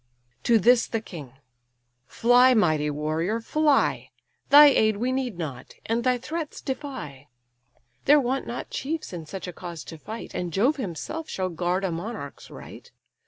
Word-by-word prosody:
To 235 - +5
this 235 +3 +4
the 225 - -2
king: 155 - -10 0.7
"Fly, 245 +2 +5
mighty 155 -8 +2
warrior! 155 +8 -1
fly; 295 +4 +1 0.4
Thy 295 +1 +10
aid 220 -7 +4
we 245 +4 -1
need 255 -7 -2
not, 140 -7 -7
and 230 +1 -1
thy 250 0 +2
threats 310 +5 -5
defy. 260 - -6 0.8
There 295 +1 +6
want 265 0 -1
not 240 - -6
chiefs 305 - -4
in 165 -3 -7
such 190 +2 -7
a 180 - -6
cause 170 -2 -8
to 160 - -10
fight, 220 +8 -8
And 175 -1 -3
Jove 245 - +2
himself 265 - -5
shall 185 -1 -2
guard 180 +2 -1
a 190 - 0
monarch's 170 -3 -7
right. - - -12
220 Hz, 160 wpm, -25 LUFS, 170-260 Hz, 0.8 s, Thy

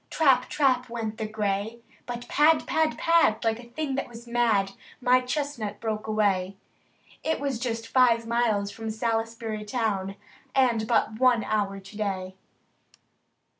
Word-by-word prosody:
Trap! 265 -5 +3
trap! 255 -4 +2
went 225 -2 -4
the 220 - -2
gray; 215 +1 -2 0.3
But 240 0 -5
pad! 305 +2 +4
pad! 320 -1 +1
pad! 330 -10 +4
like 225 0 +1
a 240 -1 -12
thing 290 +2 -3
that 270 - -2
was 235 0 -11
mad. 230 -5 +2 0.3
My 250 0 +4
chestnut 250 -6 -3
broke 220 -1 -3
away. 200 -3 +1 0.7
It 320 - 0
was 275 -4 -2
just 230 -2 -3
five 235 -3 +4
miles 225 -4 +1
from 225 +1 -6
Salisbury 225 -1 -2
town. 210 -4 -2 0.4
And 240 -5 +3
but 220 -1 +1
one 250 -3 +4
hour 200 -2 -1
to 195 +2 -14
day. 190 -3 -3
230 Hz, 145 wpm, -26 LUFS, 215-250 Hz, 0.7 s, pad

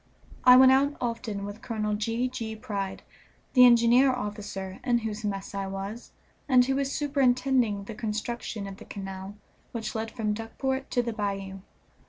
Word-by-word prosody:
I 250 0 +10
went 260 0 +8
out 280 +2 +3
often 230 -4 -3
with 205 +3 -8
Colonel 215 -3 -2
G. 225 +4 -1
G. 230 -3 -5
Pride, 200 -4 -4 0.5
the 250 -2 +9
engineer 240 +3 +5
officer, 205 -5 -5
in 245 -2 +2
whose 220 -1 -4
mess 195 -2 -4
I 195 -1 -3
was, 195 +4 -6 0.4
and 250 -2 +6
who 270 - 0
was 275 0 -1
superintending 260 -7 +1
the 225 - -7
construction 220 -1 -4
of 195 -1 -8
the - - -12
canal 195 0 -7 0.4
which 230 -2 -4
led 225 0 -3
from 215 -3 -2
Duckport 265 +5 -3
to 245 - +1
the 235 -1 -3
bayou. 195 -2 -3
225 Hz, 165 wpm, -27 LUFS, 205-250 Hz, 0.5 s, I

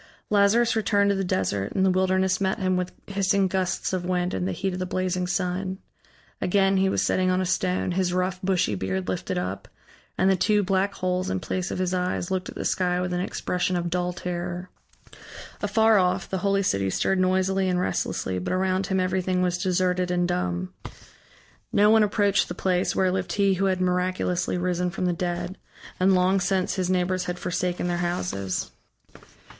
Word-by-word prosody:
Lazarus 210 +3 +4
returned 205 -2 +2
to - - +1
the 195 - -1
desert, 100 - -1
and 190 - +2
the 190 - +4
wilderness 185 0 +1
met 190 0 +1
him 185 -3 0
with 180 0 -2
hissing 195 -1 +1
gusts 185 0 -1
of 185 -1 -1
wind 180 0 -1
and 90 -1 -1
the - - -1
heat 190 - -2
of 180 - -4
the 185 - -2
blazing 185 0 -1
sun. 185 +1 -2 0.6
Again 195 +1 +3
he 190 0 +3
was - - +1
sitting 185 0 +1
on 185 0 +2
a 185 - 0
stone, 185 0 0
his 180 0 0
rough, 185 0 -1
bushy 185 - +1
beard 95 -1 -2
lifted 95 0 -2
up; 90 +2 -4 0.5
and 190 - +3
the 190 - +4
two 205 +3 +2
black 195 +1 0
holes 185 0 -1
in 95 - -1
place 185 - -3
of - - -3
his 185 0 -1
eyes 180 0 -1
looked 185 -1 -2
at - - -10
the - - -4
sky 180 -1 +1
with 180 0 -2
an 180 - 0
expression 180 0 -1
of 175 -1 -2
dull 180 0 0
terror. 175 0 -5 0.9
Afar 220 +1 +4
off 185 +1 +1
the 190 - -2
holy 195 +1 +1
city 100 - +1
stirred 190 - +1
noisily 190 +1 +2
and 180 -1 +1
restlessly, 95 - -1
but 90 - -3
around 185 +1 0
him 190 -2 0
everything 185 0 0
was 180 -1 0
deserted 180 -1 +1
and 175 0 +1
dumb. 90 - -2 1.0
No 210 +1 +5
one 220 0 +6
approached 205 -1 +2
the - - -6
place 185 -1 0
where 185 -1 +2
lived 180 -2 -2
he 200 -1 +3
who 190 +1 0
had 185 -1 +1
miraculously 180 0 0
risen 180 0 0
from 185 +1 -3
the 180 - +1
dead, 175 +2 -3 0.4
and 190 +1 +4
long 185 +2 +3
since 185 0 0
his 185 -1 -1
neighbors 185 0 0
had 180 0 -3
forsaken 180 0 -2
their 175 -1 0
houses. 100 - -2
185 Hz, 195 wpm, -25 LUFS, 180-190 Hz, 1.0 s, one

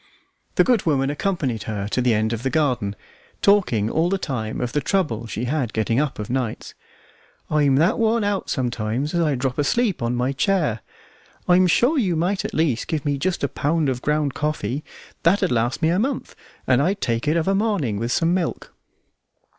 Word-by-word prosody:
The - - +5
good 240 -8 +1
woman 135 -2 +2
accompanied 145 - -2
her 100 -2 -3
to 125 - 0
the 120 -2 +3
end 110 +2 0
of 115 - -3
the 135 - -1
garden, 125 -9 0 0.4
talking 180 - +3
all 160 +8 +1
the 195 - +1
time 120 - -4
of 125 -1 -2
the 145 - 0
trouble 130 - -1
she 110 +1 -4
had 130 -3 -1
getting 115 +2 +1
up 150 -2 -1
of 105 - -5
nights. 125 -3 -3 0.8
"I'm 145 -3 +3
that 165 - +2
worn 225 0 +2
out 205 -1 -1
sometimes 125 +2 -2
as 170 - +1
I 155 -4 +2
drop 130 +1 -2
asleep 205 - +1
on 120 +1 0
my 125 +2 0
chair. 150 - +1 0.7
I'm 180 +1 +5
sure 260 - +3
you 185 -8 +1
might 180 +5 0
at - - -5
least 145 -8 0
give 155 -3 -2
me 145 -1 0
just 185 +2 -1
a - - +3
pound 150 +1 0
of 125 -1 -2
ground 150 -1 0
coffee; 150 -3 -2 0.4
that'd 170 -3 +2
last 120 +5 0
me 160 - +4
a 175 +3 +2
month, 260 +3 -2 0.3
and 130 0 +3
I'd 190 +7 0
take 115 -1 -1
it 155 +3 +2
of 165 - 0
a 195 - +3
morning 195 - 0
with 115 +2 -2
some 165 +6 +2
milk." 180 -3 -3
145 Hz, 200 wpm, -22 LUFS, 120-175 Hz, 0.8 s, The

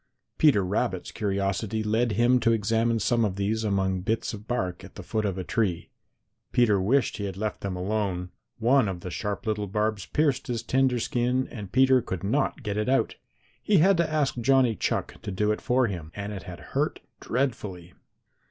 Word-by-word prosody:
Peter 125 -11 +5
Rabbit's 95 -1 -1
curiosity 100 +2 -1
led 110 +2 +1
him 120 +4 +4
to 115 - +3
examine 115 +2 +1
some 115 +2 +2
of 100 -4 0
these 105 +3 -1
among 95 -3 0
bits 110 +4 -1
of 105 +1 -9
bark 95 -8 -2
at - - -13
the - - -8
foot 110 -1 -1
of 95 -2 -1
a 95 - -3
tree. 90 -3 -1 0.6
Peter 105 -5 +3
wished 125 +6 +2
that - - -6
he 100 - -2
had 95 -2 -5
left 110 +1 -3
them 95 -2 -3
alone. 90 -1 -2 0.3
One 120 +1 +3
of 90 -3 -4
the 90 - -6
sharp 105 +5 -3
little 105 -2 -1
barbs 105 -1 -1
pierced 150 -2 +1
his 120 -2 -2
tender 130 0 +2
skin 125 +2 0
and 105 -5 -8
Peter 130 0 +5
could 95 -5 -5
not 135 +5 0
get 105 -1 -2
it 105 +3 0
out. 135 - +2 0.5
He 210 - +3
had 190 +5 +5
to 170 -2 +1
ask 145 -5 0
Johnny 130 -1 +3
Chuck - - -2
to - - -6
do 105 +2 +1
it 105 - -2
for 125 +1 +2
him, 85 -7 -5
and 100 0 -5
it 95 - -6
had 90 - -8
hurt - - 0 0.2
dreadfully. 105 -9 -3
110 Hz, 200 wpm, -26 LUFS, 100-125 Hz, 0.6 s, Peter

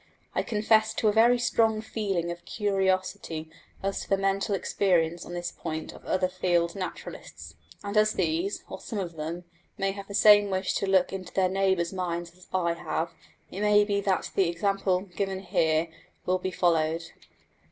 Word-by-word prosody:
I - - +1
confess 220 0 +2
to 215 - +2
a - - +1
very 235 +3 +5
strong 225 -2 +2
feeling 195 -6 -2
of 170 0 -8
curiosity 190 -5 -1 0.3
as 195 0 -1
to - - -9
the 195 - +3
mental 195 +1 0
experience 175 -4 +1
on 175 - -7
this 175 0 -3
point 160 -1 -5
of - - -14
other 185 0 +2
field 175 -2 +1
naturalists; 185 -2 -7 0.3
and 200 +1 -4
as 215 0 +4
these, 340 +9 -1
or - - -7
some 225 - -5
of 175 -4 -4
them, 165 +3 -5 0.3
may 195 0 0
have 200 0 -8
the 200 - -6
same 205 -1 +7
wish 185 0 -1
to 195 - -1
look 190 -1 +3
into 185 -2 -6
their 185 -1 +3
neighbours' 190 -2 +1
minds 175 -2 -3
that 180 +1 -19
I 170 -2 +1
have, 170 0 -3 0.4
it 195 - -5
may 210 0 +5
be 200 -1 0
that 190 -2 0
the 190 -3 +2
example 190 +1 0
given 190 0 -3
here 160 -3 +1 0.4
will 185 0 +1
be 185 - -2
followed. 165 -2 +1
190 Hz, 180 wpm, -27 LUFS, 175-205 Hz, 0.4 s, same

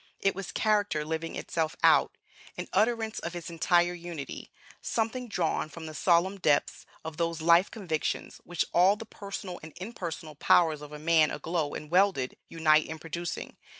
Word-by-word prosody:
It 195 - +2
was 195 -2 -6
character 205 -8 +1
living 160 +1 -3
itself 160 -1 -2
out, - - +5 0.4
an - - -4
utterance 225 0 +1
of 170 +1 -5
its 170 -1 -6
entire 175 +1 +3
unity, 170 -5 -7 0.3
something 235 +2 -2
drawn 205 - -1
from 165 0 -9
the 155 - -7
solemn 180 +5 +2
depths 150 -5 +1 0.2
of 160 -1 -6
those 170 -1 -1
life 170 +3 +5
convictions 175 -8 -3
which 175 -1 -1
all 185 +4 +5
the 225 +1 -8
personal 200 -4 -7
and 155 -1 -11
impersonal 170 -6 -6
powers 155 +1 +3
of 150 0 -10
a 150 - -7
man, 155 0 +4
aglow 160 -3 -2
and 150 0 -7
welded, 180 -9 +2
unite 155 -2 +3
in 160 - -6
producing. 170 +2 -5
170 Hz, 165 wpm, -29 LUFS, 160-195 Hz, 0.4 s, out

